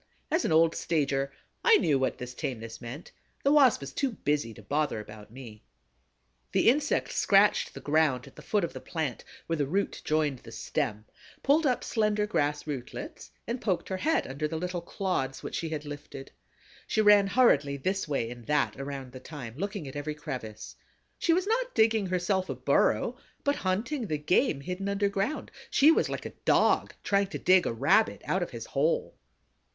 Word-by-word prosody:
As 325 +3 +2
an - - 0
old 165 +1 +5
stager, 140 -4 0 0.3
I 455 -2 +7
knew 145 - +2
what 130 - 0
this 125 0 -7
tameness 115 -3 -5
meant: 125 +7 -8 0.3
the 280 - +4
Wasp 275 - +5
was 140 -1 -7
too 275 -4 -1
busy 145 - -1
to 110 - -13
bother 145 +1 0
about 105 0 -11
me. 115 -3 -11 0.9
The - - +5
insect 290 +4 +1
scratched 200 +1 +3
the - - -8
ground 145 -4 +2
at - - -15
the - - -11
foot 210 -3 0
of 170 - -2
the - - -7
plant, 155 -8 -3 0.2
where 165 - -1
the 145 -2 0
root 195 +7 -1
joined 150 -4 0
the - - -13
stem, 105 +1 -3 0.4
pulled 295 +2 +4
up 250 - +1
slender 210 -2 +1
grass 145 -8 0
rootlets 140 -5 -6 0.2
and 235 +1 -3
poked 190 -5 -1
her 190 - -2
head 315 +11 +1
under 140 +3 -3
the 160 +1 -4
little 180 +1 -3
clods 170 -7 -2
which - - -6
she 165 - -2
had 155 -1 -4
lifted. 145 -2 -8 0.6
She - - 0
ran 210 -2 +6
hurriedly 150 - +3
this 190 +7 -1
way 120 -6 -1
and 120 -2 -10
that 145 -2 +1
around 135 -2 -6
the 130 - -9
thyme, 130 -4 -8
looking 195 -1 -4
at 135 - -8
every 145 +1 -3
crevice. 110 -7 -7 0.4
She 335 - +2
was 360 +3 +2
not 485 +4 -1
digging 220 -2 +3
herself 185 +1 0
a - - -2
burrow - - +2 0.3
but 285 0 +1
hunting 220 +7 -1
the 155 -3 -1
game 150 - +1
hidden 180 +5 -4
underground; 200 +6 -1 0.2
she 300 +3 +6
was - - +2
like - - -4
a - - -6
Dog - - +3
trying 200 0 +2
to 195 - -5
dig 185 -1 +4
a - - 0
Rabbit 140 - +2
out 190 - 0
of 175 - -2
his 115 -3 -7
hole. 150 +4 0
160 Hz, 190 wpm, -29 LUFS, 135-205 Hz, 0.9 s, I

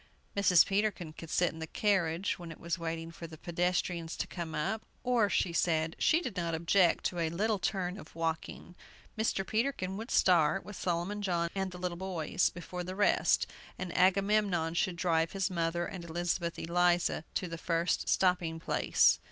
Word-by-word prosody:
Mrs. 185 -4 +6
Peterkin 195 -5 -1
could 165 0 -10
sit 175 +2 +2
in 160 - -10
the 160 - -5
carriage, 185 -2 0
when 170 -2 -8
it 160 - -11
was 170 +1 -3
waiting 165 0 -4
for 165 0 -8
the 160 -1 -11
pedestrians 175 0 -1
to - - -1
come 170 -3 -6
up; 215 +9 -1 0.2
or, 240 -5 +3
she 175 - +1
said, 160 -1 +1
she 330 - +4
did 265 - -5
not 170 -3 -1
object 170 +2 +3
to 175 - -1
a 165 -1 +1
little 205 +5 0
turn 185 0 -2
of 155 - -13
walking. 165 +1 -4 0.4
Mr. 220 -3 0
Peterkin 215 -5 -1
would 225 +3 -6
start, 180 0 +3
with 205 - -8
Solomon 180 +4 -2
John 170 -4 0
and 190 -1 -1
the 180 - -9
little 180 -1 -3
boys, 180 -2 0
before 180 +1 -6
the 185 +1 -6
rest, 205 +1 +3 0.3
and 185 -1 -5
Agamemnon 195 -3 +3
should 175 +1 0
drive 165 -2 +1
his 195 0 -1
mother 170 0 0
and 180 -1 -7
Elizabeth 170 0 -2
Eliza 175 -1 +1
to 185 - -1
the 165 -1 -6
first 170 0 0
stopping 180 -3 +2
place. - - +3
175 Hz, 180 wpm, -31 LUFS, 165-190 Hz, 0.4 s, Mrs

